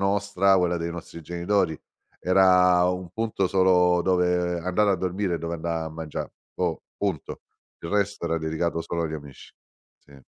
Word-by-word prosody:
nostra, 100 -1 +2
quella 90 -2 +1
dei 85 0 -3
nostri 85 0 -8
genitori, 85 0 -1 0.4
era 90 -1 +5
un 90 -1 -3
punto 110 -1 -1
solo 90 -1 +4
dove 90 -1 +1
andare 95 +4 +1
a - - +1
dormire 95 0 -1
e - - -2
dove 85 +1 -4
andà 85 0 -3
a 80 - -6
mangià. 80 -1 -5 0.3
Boh, - - -1 0.2
punto. - - -3 0.4
Il 85 - -6
resto 100 -2 0
era 85 0 0
dedicato 80 +1 -2
solo 85 +1 -3
agli 80 -1 -3
amici. 75 -3 -10 0.5
Sì. 70 -1 -18
90 Hz, 165 wpm, -25 LUFS, 85-95 Hz, 0.5 s, era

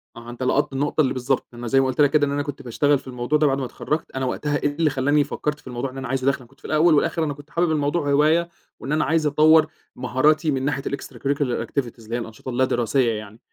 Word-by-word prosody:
آه، 115 0 -10
أنت 120 +2 -6
لقطت 130 - +1
النقطة 145 +3 +1
اللي 130 - +1
بالضبط 130 +1 -1
أنا 120 0 -7
زَي 135 +4 +3
ما 135 - +3
قُلت 130 +3 0
لك 145 - +6
كده 150 -2 +3
إن 140 - -2
أنا 145 0 -1
كنت 145 -1 -6
باشتغل 140 +3 +1
في - - -18
الموضوع 125 +4 0
ده 150 - +4
بعد 135 0 +1
ما 135 - -2
اتخرجت 150 +5 -4
أنا 130 0 -1
وقتها 145 +3 -1
إيه 145 +1 -1
اللي 160 0 +2
خلّاني 145 +2 +2
فكّرت 150 +1 -3
في - - -17
الموضوع 125 +1 -3
إن 135 - -11
أنا 135 -2 -5
عايز 130 +1 -2
أدخل 140 +1 +2
أنا 125 - -15
كنت 135 - -25
في - - -17
الأول 155 +2 +4
والآخر 165 +2 +1
أنا 145 -2 -1
كنت 145 +1 -14
حابب 170 -1 +1
الموضوع 145 0 0
هواية 155 +4 +3 0.3
وإن 135 - -6
أنا 155 0 +2
عايز 160 -1 +1
أطوّر 155 +2 +5 0.3
مهاراتي 150 +6 +2
من 135 -1 -1
ناحية 135 -1 -1
الextracurricular 140 -1 -2
activities 120 -4 -4
اللي 115 +2 -5
هي 120 - -1
الأنشطة 115 +3 -8
اللا 130 +1 +2
دراسية 120 0 +1
يعني 110 0 -7
140 Hz, 260 wpm, -23 LUFS, 130-150 Hz, 0.3 s, لك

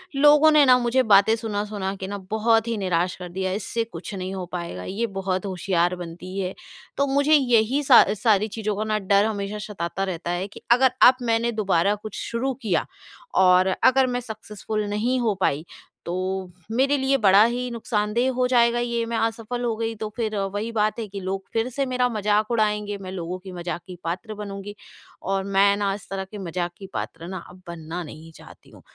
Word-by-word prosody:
लोगों 295 +2 +6
ने 300 -1 +6
ना 250 -1 +7
मुझे 245 +2 +2
बातें 215 +1 +5
सुना-सुना 205 -3 -3
के 190 0 -6
ना 200 0 -4
बहुत 225 +1 +2
ही 230 -2 -1
निराश 180 -2 0
कर 180 -1 -8
दिया 190 +1 -2
है, 190 - -1
इससे 225 +3 -2
कुछ 190 -2 -9
नहीं 185 0 -4
हो 185 -1 -4
पाएगा, 170 - -5
ये 225 +5 -2
बहुत 185 0 -2
होशियार 180 -1 0
बनती 180 +2 -8
है। 185 -1 -2 0.4
तो 280 0 +2
मुझे 285 +3 +2
यही 255 0 +3
सा 265 -3 +8 0.2
सारी 215 -2 +4
चीज़ों 215 -1 -3
का 215 - -2
ना 215 0 0
डर 200 +1 +3
हमेशा 210 -1 -3 0.2
सताता 170 +2 -3
रहता 175 -2 -3
है 180 +2 -2
कि 205 - -13
अगर 260 +1 +5 0.2
अब 255 - +6
मैंने 235 0 +1
दोबारा 200 -2 +1
कुछ 210 0 -9
शुरू 250 +4 -2
किया 180 -8 0 0.6
और 185 +1 +5 0.2
अगर 260 0 +5
मैं 245 0 -1
सक्सेसफुल 215 -2 -5
नहीं 235 +5 0
हो 220 -4 +1
पाई, 155 -1 +1 0.4
तो 170 - -3 0.6
मेरे 270 +4 +2
लिए 270 0 +2
बड़ा 200 +2 +7
ही 245 +1 -2
नुक़सानदेह 230 +2 0
हो 250 0 +1
जाएगा 240 -1 +3
ये। 235 -1 -1
मैं 230 0 -2
असफल 225 +2 -2
हो 235 -2 0
गई 225 0 -2
तो 215 - -4
फिर 220 -3 -2
वही 205 +3 -2
बात 215 +1 0
है 220 - -4
कि 200 0 -7
लोग 190 +1 -3
फिर 225 +2 0
से 275 +2 -2
मेरा 250 -1 +1
मज़ाक 210 0 +1
उड़ाएँगे, 210 -2 0
मैं 185 -1 -8
लोगों 180 0 -4
की 190 0 -10
मज़ाक 175 -1 -5
की 180 - -8
पात्र 185 +6 -4
बनूँगी। 205 0 -7 0.5
और 195 0 -1
मैं 200 +1 +3
ना 200 -1 0
इस 205 - -12
तरह 195 -1 -3
के 210 - -7
मज़ाक 175 -1 -3
की 195 - -9
पात्र 170 - -5
ना 190 0 -5
अब 185 +1 -15
बनना 170 +1 -6
नहीं 160 +1 -11
चाहती - - -16
हूँ, - - -16
210 Hz, 205 wpm, -24 LUFS, 190-235 Hz, 0.6 s, सा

